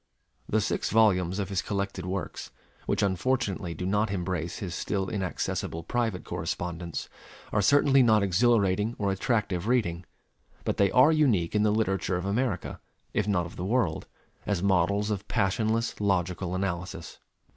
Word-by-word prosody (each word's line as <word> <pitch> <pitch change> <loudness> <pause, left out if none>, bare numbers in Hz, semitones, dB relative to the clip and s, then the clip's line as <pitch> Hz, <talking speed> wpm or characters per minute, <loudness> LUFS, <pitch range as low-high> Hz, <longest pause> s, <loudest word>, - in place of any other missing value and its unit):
The 110 - +2
six 100 - -1
volumes 95 -5 +3
of 100 -2 -2
his 95 -2 0
collected 100 -2 -3
works, 95 0 -4 0.4
which - - +1
unfortunately 95 -3 0
do 90 - -4
not 105 +3 +1
embrace 90 -3 -3
his 90 -4 -5
still 95 +1 -2
inaccessible 90 -4 -3
private 115 -3 -1
correspondence, 85 0 -4 0.4
are 105 - +2
certainly 135 +5 +5
not 110 -4 +4
exhilarating 105 +1 +2
or 100 -2 0
attractive 100 -2 -1
reading; 100 -9 +1 0.6
but - - -1
they 100 -1 +4
are 130 +8 +6
unique 120 - +2
in 105 - +2
the 105 - +3
literature 95 -4 0
of 90 - -4
America, 105 -1 -1 0.3
if - - 0
not 90 -4 +1
of 85 - -10
the 90 - -4
world, 100 -6 0 0.4
as 100 -3 0
models 100 +2 +2
of 100 0 -3
passionless 110 +2 0
logical 90 -2 0
analysis. 90 -3 -4
100 Hz, 150 wpm, -28 LUFS, 90-110 Hz, 0.6 s, are